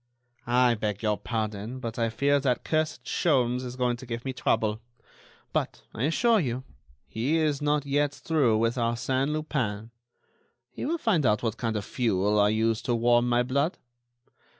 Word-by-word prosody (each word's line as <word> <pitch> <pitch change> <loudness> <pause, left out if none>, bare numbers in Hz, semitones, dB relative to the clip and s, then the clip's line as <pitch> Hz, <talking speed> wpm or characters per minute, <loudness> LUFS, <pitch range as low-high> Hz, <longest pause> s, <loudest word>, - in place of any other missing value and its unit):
"I 125 0 +4
beg 105 -1 -3
your 105 -1 +2
pardon, 110 +2 -4
but 115 -2 -5
I 115 -1 +1
fear 140 +5 +2
that 130 -3 0
cursed 155 -1 -1
Sholmes 125 -6 +1
is 125 0 -6
going 125 -1 0
to 130 +1 -11
give 120 +1 -5
me 135 - -2
trouble. 110 -3 0 0.7
But, - - -2
I 120 - -1
assure 225 +8 +3
you, 130 -5 -2 0.4
he 130 +9 0
is 150 -3 +1
not 145 0 +1
yet 145 +1 +1
through 140 -7 +1
with 115 +3 +1
Arsène 130 +4 0
Lupin. 120 -8 -2 0.8
He - - -5
will 335 +3 0
find 210 - +1
out 105 -3 +2
what 115 -1 -1
kind 115 -2 -2
of 105 - -2
fuel 105 -4 +1
I 105 0 +5
use 110 +1 +1
to 120 - 0
warm 120 +1 +3
my 120 0 +3
blood. 140 +7 0
125 Hz, 175 wpm, -27 LUFS, 115-140 Hz, 0.8 s, I